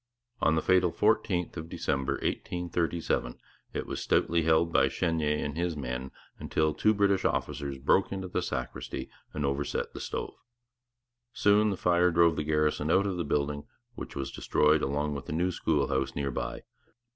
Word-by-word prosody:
On 80 - +3
the 80 - 0
fatal 90 -2 +4
fourteenth 100 -4 +1
of 80 0 -6
December 70 -3 -1
1837 85 -5 -2 0.3
it - - -3
was - - -4
stoutly 85 0 +2
held 80 +1 +2
by - - +5
Chenier 80 -4 0
and 75 - -4
his 85 -1 -1
men, 65 -1 -4 0.3
until 80 -1 0
two 110 - +3
British 100 -1 +2
officers 70 -2 -1
broke 70 +8 +2
into 95 -1 -4
the - - -1
sacristy - - -4 0.2
and 75 - -2
overset 70 +1 -2
the - - -7
stove. - - -4 1.0
Soon 105 +1 +4
the 100 - -2
fire 90 0 +3
drove 85 -1 +4
the 75 - -1
garrison 75 0 +1
out 95 +4 +4
of 95 -3 -1
the 85 - -1
building, 75 -1 -1 0.3
which - - -8
was 70 - -3
destroyed 75 0 +2
along 75 +2 -1
with 70 -1 -6
the 85 - -3
new 90 +3 +1
school 75 -4 0
house 65 0 -1
near 70 -1 -1
by. - - -4
80 Hz, 170 wpm, -29 LUFS, 75-90 Hz, 1.0 s, by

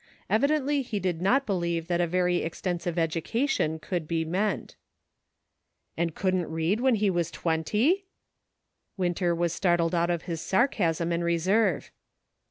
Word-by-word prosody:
Evidently 285 +4 +2
he 235 -5 -3
did 180 -3 -2
not 265 +9 +3
believe 170 -4 -1
that 175 -1 +1
a 175 - +1
very 180 +1 +1
extensive 175 +1 -3
education 165 - 0
could 165 0 -4
be 165 0 -1
meant. 195 +6 -2 1.2
"And 170 -1 -1
couldn't 185 -2 0
read 165 +7 0
when 260 -2 +4
he 205 -2 +2
was 170 -2 0
twenty! 210 - 0 0.5
" - - -53
Winter 175 -1 0
was 170 0 0
startled 175 -2 +1
out 170 0 +2
of 170 -2 -1
his 165 -2 -4
sarcasm 175 - +1
and 170 0 0
reserve. 180 +3 +1
175 Hz, 145 wpm, -27 LUFS, 170-205 Hz, 1.2 s, when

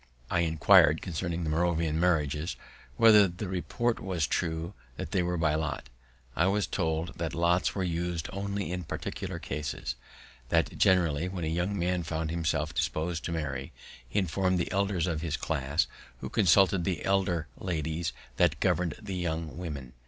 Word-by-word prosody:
I 90 - +2
inquir'd 80 -1 +5
concerning 85 -1 -3
the 80 - -1
Moravian 80 -1 +1
marriages, 80 -2 +1 0.4
whether 110 -3 +7
the 90 +4 -6
report 110 +6 -1
was 90 -5 -1
true 80 +2 -2 0.2
that - - -5
they 95 - +2
were 90 0 -1
by 80 -2 +2
lot. 80 -4 -2 0.5
I 90 - +3
was 100 +1 +2
told 80 -1 -2
that 80 -1 -2
lots 85 +2 +2
were 95 - 0
us'd 85 -1 -2
only 100 -1 -3
in 90 0 -3
particular - - -4
cases; 70 -4 -4 0.6
that - - +2
generally, 85 -3 +3
when 90 -2 -4
a - - -1
young 95 +4 -1
man 90 0 0
found 80 -1 -3
himself 80 -2 -1
dispos'd 80 +1 -1
to - - -2
marry, 75 -5 -3 0.4
he - - -3
inform'd 95 0 +1
the 85 - -1
elders 95 -3 +1
of 85 -4 -2
his 80 -2 -2
class, 75 0 0 0.3
who - - -5
consulted 95 -2 +4
the 90 -2 -2
elder 95 -4 +1
ladies 80 -2 -2 0.3
that - - +3
govern'd 85 -4 +1
the 100 -4 -5
young 80 -3 -3
women. 75 -7 -6
85 Hz, 165 wpm, -29 LUFS, 80-90 Hz, 0.6 s, whether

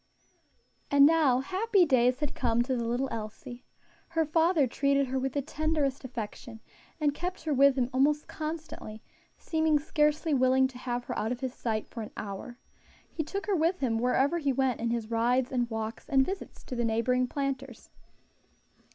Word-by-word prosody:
_ - - -38 0.6
And 280 0 +7
now 295 -5 +4
happy 385 +5 +2
days 255 -2 +3
had 295 - -2
come 235 -1 +1
to 260 +1 -1
the 235 -1 -2
little 245 +3 0
Elsie. 225 +2 -7 0.4
Her 325 -1 0
father 325 0 +3
treated 275 +2 +1
her 260 +1 -2
with 265 0 -2
the 285 - -1
tenderest 300 -2 -1
affection, 235 -2 -7 0.4
and 295 -2 +2
kept 360 +4 -5
her 310 -2 0
with 275 0 +5
him 250 -2 +2
almost 290 +3 +2
constantly, 310 -8 -6 0.3
seeming 315 -1 +1
scarcely 300 +1 +1
willing 260 0 +4
to 250 -1 -12
have 245 -1 -3
her - - -5
out 220 - -1
of 245 - -4
his 260 -2 -3
sight 220 -4 -3
for 230 - -7
an 215 - -6
hour. 210 +4 -6 0.5
He - - -3
took 395 +6 -4
her 410 - +1
with 335 +2 +2
him 230 -4 0
wherever 265 +7 +2
he 285 -3 +1
went 260 -2 0
in 235 - 0
his 230 -1 -3
rides 245 +3 +1
and 245 -2 0
walks 220 +3 -5
and 265 -2 +4
visits 385 +1 -6
to 255 - -6
the 240 - -1
neighboring 235 +3 +1
planters. 270 -3 -4
265 Hz, 185 wpm, -29 LUFS, 240-300 Hz, 0.6 s, And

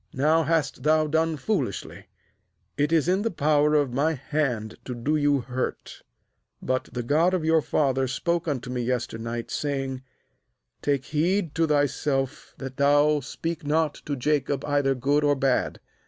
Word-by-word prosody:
now 155 +5 +3
hast 160 0 0
thou 155 +1 +3
done 160 +1 +1
foolishly. 185 - -3 0.7
29It 145 +2 +2
is 160 -2 +3
in 185 +2 +2
the 230 - 0
power 150 -3 +2
of 145 -4 +2
my 150 +5 +2
hand 130 -6 -2
to 125 - -5
do 135 +6 0
you 145 -2 +2
hurt; 125 +2 -4 0.6
but 130 0 -2
the 125 -1 -3
God 160 +9 +2
of 165 -4 -2
your 160 0 +4
father 135 -3 +1
spoke 170 +6 -1
unto 130 -4 -3
me 125 -1 -2
yester 120 -2 -2
night, 115 +1 -5
saying: 135 -3 -2 0.8
Take 140 -2 0
heed 170 +2 0
to 165 0 +1
thyself 145 -1 -1
that 135 -1 -7
thou 145 +1 +4
speak 165 +4 -5
not 150 +1 +1
to 145 - -1
Jacob 140 0 0
either 145 -2 +1
good 140 +4 +1
or 145 0 +3
bad. 135 -1 0
145 Hz, 160 wpm, -25 LUFS, 130-155 Hz, 0.8 s, your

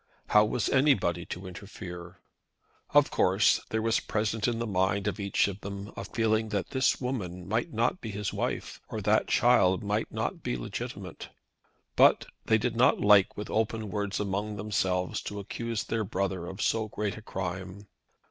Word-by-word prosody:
How 105 - +6
was 110 +1 -1
anybody 110 - +2
to 90 +2 -6
interfere? 90 -2 -9 0.7
Of 145 0 +4
course, 95 +3 +3
there 110 0 -1
was 115 0 +2
present 110 0 -1
in 120 -1 0
the 115 - -2
mind 95 -1 +1
of 105 - -2
each 100 -1 +2
of 100 0 -6
them 100 +1 -7
a - - -5
feeling 110 -1 0
that 100 -3 -2
this 130 -1 +2
woman 95 -9 -4
might 110 +4 -1
not 120 +11 0
be 115 - -5
his 105 0 -3
wife, - - -3
or - - -4
that - - +2
the - - -6
child 105 -7 +4
might 105 +2 -1
not - - -3
be - - -2
legitimate. - - -6 0.7
But - - +5 0.2
they 110 - +4
did 115 +2 -1
not 125 +2 +4
like 100 -2 +5
with 105 - -5
open 110 -1 -1
words 105 -1 -2
among 105 +1 -2
themselves 95 -3 -1
to 105 - -6
accuse 115 +2 -3
their 115 -1 -1
brother 95 -3 -2
of 95 +3 -4
so 110 -1 +1
great 105 -1 -3
a 110 - -9
crime. 95 0 -5
105 Hz, 175 wpm, -29 LUFS, 95-110 Hz, 0.7 s, How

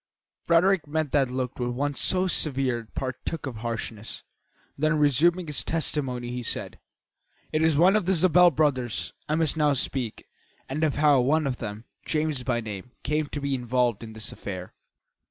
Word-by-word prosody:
Frederick 175 0 +3
met 155 -1 -1
that 135 -3 +2
look 125 0 -3
with 120 0 -1
one 140 +4 -1
so 185 +6 +2
severe 135 -8 +1
it 115 -1 -15
partook 135 +4 -4
of 130 -5 -5
harshness; 115 -1 -5 0.5
then, 155 +2 +1
resuming 160 +5 +3
his 150 -3 -1
testimony, 130 -6 -2
he 125 0 -4
said: 120 - -3 0.7
"It 155 - +1
is 160 -2 +3
of 185 +3 +4
the 190 - +4
Zabel 180 0 +6
brothers 130 -7 0 0.2
I 155 - +2
must 160 -1 +2
now 150 -2 +3
speak, 125 -3 -2 0.4
and 150 +4 -2
of 155 -3 +1
how 145 -3 +4
one 155 +5 +2
of 130 -3 -1
them, 105 0 -6 0.2
James 155 -3 -1
by 120 -2 -1
name, 105 +1 -7
came 150 0 0
to 145 - -5
be 140 -1 -2
involved 125 -3 0
in 110 -1 -9
this 110 0 -3
affair. 95 -3 -7
140 Hz, 175 wpm, -26 LUFS, 125-155 Hz, 0.7 s, Zabel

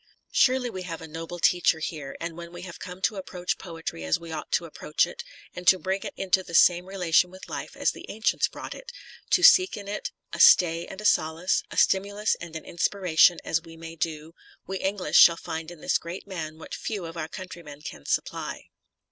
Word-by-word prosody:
f - - -37 0.2
Surely 260 -1 +3
we 190 -6 -6
have 170 -3 -6
a 160 - -9
noble 165 +2 -7
teacher 175 -1 +3
here, 155 -3 -5
and 165 -1 -5
when 170 0 -9
we 175 - -9
have 170 -2 -9
come 180 +1 -9
to 210 - +1
approach 180 -1 -3
poetry 165 - -6
as 80 0 +1
we 170 -1 -9
ought 155 - -6
to 170 - +1
approach 155 -1 0
it, 475 -1 -8 0.3
and 180 0 -9
to 190 - +8
bring 190 +1 -2
it - - -7
into 190 0 +2
the 170 -2 -7
same 175 +1 +5
relation 180 -2 +2
with 185 +1 -12
life - - -6
as - - +2
the - - -11
ancients 220 +1 +1
brought - - -8
it; - - -10 0.4
to - - +3
seek 375 - +7
in 200 -1 -8
it 205 +1 -4 0.2
a - - -5
stay 170 -1 +6
and 195 +2 -8
a - - -8
solace, 165 -1 +2
a - - -9
stimulus 200 +2 +2
and 170 -1 -8
an 160 - -6
inspiration 175 -1 +3
as 165 - 0
we 165 -1 -13
may 165 0 -9
do, 160 0 -4 0.3
we 190 +1 -4
English 195 -1 +2
shall 170 -1 +8
find 160 0 -5
in 175 -3 -12
this - - +1
great 170 +3 -7
man 160 -5 -6
what 160 - -10
few 205 -6 -4
of 165 0 -8
our 160 -2 -4
countrymen 170 -5 -9
can 75 - -8
supply. - - -3
175 Hz, 220 wpm, -26 LUFS, 165-190 Hz, 0.4 s, to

